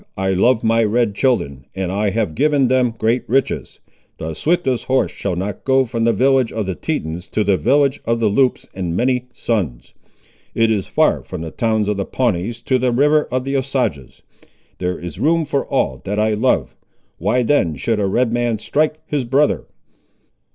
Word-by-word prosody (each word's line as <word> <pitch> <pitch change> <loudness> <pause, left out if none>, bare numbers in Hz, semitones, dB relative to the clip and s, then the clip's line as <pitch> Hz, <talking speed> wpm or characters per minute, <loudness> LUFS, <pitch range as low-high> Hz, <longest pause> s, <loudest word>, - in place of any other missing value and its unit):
I 95 0 0
love 115 +5 +3
my 115 0 +3
red 110 0 +1
children, 70 - -1
and 95 -2 -2
I 100 +2 0
have 100 -4 -1
given 140 - +2
them 125 -3 +2
great 115 +3 +1
riches. 135 +2 -1 0.4
The 80 0 -5
swiftest 135 - 0
horse 130 0 +1
shall 100 -3 -3
not 95 +2 -4
go 135 0 +3
from 115 -1 -2
the 115 - +4
village 130 +2 +2
of 110 -2 -3
the 95 - -2
Tetons 90 - -4
to 110 - 0
the 100 -1 +3
village 135 - +2
of 115 0 0
the 115 - +2
Loups 125 +5 +1
in 90 -3 -3
many 125 +3 0
suns. 95 - -3 0.6
It 115 0 +3
is 100 -4 -1
far - - +2
from - - -7
the 80 -1 -6
towns 110 0 0
of 105 -1 0
the 100 - -2
Pawnees 115 -1 -1
to 130 -3 +1
the 125 0 +1
river 150 +5 +3
of 125 0 -1
the 135 +1 -2
Osages. 125 - -2 0.6
There 90 0 -2
is 90 -1 -8
room 165 +1 +2
for 140 -1 -1
all 65 -1 -1
that 100 +1 -2
I 110 0 +2
love. 120 +5 +1 0.4
Why 110 +8 +1
then 110 - +2
should 110 - -1
a 100 - +1
Red 115 +4 +1
man 120 -2 0
strike 155 +7 0
his 145 -3 -1
brother?" 135 +5 +1
115 Hz, 190 wpm, -19 LUFS, 100-130 Hz, 0.6 s, the